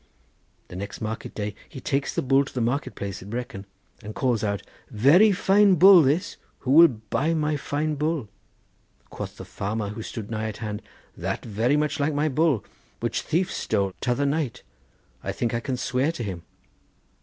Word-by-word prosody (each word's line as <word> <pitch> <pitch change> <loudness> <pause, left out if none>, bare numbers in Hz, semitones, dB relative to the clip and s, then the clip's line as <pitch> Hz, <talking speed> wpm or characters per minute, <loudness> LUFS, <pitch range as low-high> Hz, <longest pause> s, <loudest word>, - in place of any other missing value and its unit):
The - - -9
next 100 +2 -6
market 110 +1 -5
day 105 -1 -3 0.2
he - - -9
takes 140 +1 -1
the - - 0
bull 135 +1 +4
to 140 - -10
the - - 0
market 120 +5 -1
place 100 -1 -5
at 95 - -10
Brecon 110 -4 -5 0.3
and 110 -1 -8
calls 120 -5 0
out: 100 -2 -1 0.3
'Very 155 - +5
fine 195 +1 +4
bull 185 +1 +9
this, 155 +7 0 0.2
who 130 - -1
will 165 +4 +9
buy 135 +6 -1
my 155 -1 0
fine 150 +2 -2
bull?' 150 -4 -1 0.8
Quoth - - -7
the - - -8
farmer 105 +1 -3
who 105 +2 -6
stood 110 0 -7
nigh 110 0 -2
at 110 - -6
hand, 105 -2 -5 0.3
'That - - -4
very 115 +6 +1
much 150 +1 0
like 145 +1 +1
my 150 +2 +1
bull, 150 - +1 0.3
which - - -1
thief 180 +4 0
stole 100 -1 -1
t'other 125 +3 +1
night; 140 -3 -1 0.6
I - - -2
think 120 -1 -2
I 115 - 0
can 125 +1 -3
swear 130 +4 0
to 120 - -5
him. 95 -5 -5
130 Hz, 185 wpm, -25 LUFS, 110-150 Hz, 0.8 s, bull